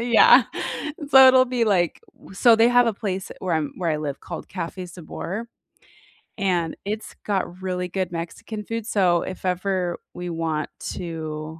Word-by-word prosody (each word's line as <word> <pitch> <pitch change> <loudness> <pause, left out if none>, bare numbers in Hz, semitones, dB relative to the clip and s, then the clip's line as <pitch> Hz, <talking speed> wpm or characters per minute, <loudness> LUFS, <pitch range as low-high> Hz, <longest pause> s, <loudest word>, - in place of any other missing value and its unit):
Yeah. 445 - +7 0.7
So 265 -1 +9
it'll 255 0 +6
be, 245 -2 0
like 180 -6 +1 0.3
so 225 +4 +5
they 230 +1 +5
have 245 0 +5
a 230 - +2
place 195 -3 -4
where 180 -3 -1
I'm 155 -2 -1
where 170 -3 -1
I 155 - +1
live 145 -2 -4
called 170 - -8
Cafe 180 0 -5
Sabor, 185 +6 -6 0.9
and 180 -5 0
it's 215 +2 -5
got 190 -3 -2
really 180 -1 -2
good 185 -1 -3
Mexican 175 +6 -6
food, 230 -1 -4
so 180 -5 +3
if 185 0 -7
ever 180 -1 -1 0.2
we 175 0 -6
want 165 -2 -2 0.2
to 160 -2 -6
185 Hz, 160 wpm, -23 LUFS, 170-215 Hz, 0.9 s, So